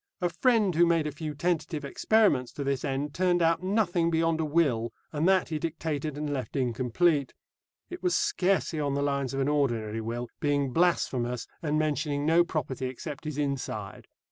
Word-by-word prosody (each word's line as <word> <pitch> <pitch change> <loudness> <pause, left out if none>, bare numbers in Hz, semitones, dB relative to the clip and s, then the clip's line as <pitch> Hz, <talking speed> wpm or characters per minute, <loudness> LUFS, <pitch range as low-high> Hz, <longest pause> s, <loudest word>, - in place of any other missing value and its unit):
A 175 -2 +1
friend 210 +2 +2
who 170 +2 +4
made 165 -2 +2
a 150 - -2
few 150 +1 -6
tentative 160 -2 -1
experiments 145 - +2
to 145 - -4
this 135 -1 -1
end 140 +1 -2
turned 180 -1 +2
out 165 +1 +2
nothing 185 -3 +1
beyond 165 0 +1
a 160 - +1
will, 140 -8 +1 0.2
and 155 +3 +1
that 190 -2 +3
he 155 -2 -2
dictated 155 -2 -3
and 150 -1 -2
left 130 -3 -4
incomplete. 135 +4 +1 0.6
(It 355 - -7
was 360 - +2
scarcely 195 - +1
on 140 -2 0
the 140 - 0
lines 140 -2 -1
of - - -2
an 135 - +1
ordinary 115 -7 0
will, 120 +2 -4
being 145 -3 0
blasphemous, 125 -8 +1 0.2
and 150 -1 0
mentioning 150 -1 0
no 165 +2 +5
property 135 -6 -3
except 145 +4 -7
his 150 -2 -4
inside.) 135 -8 -3
150 Hz, 180 wpm, -28 LUFS, 135-170 Hz, 0.6 s, no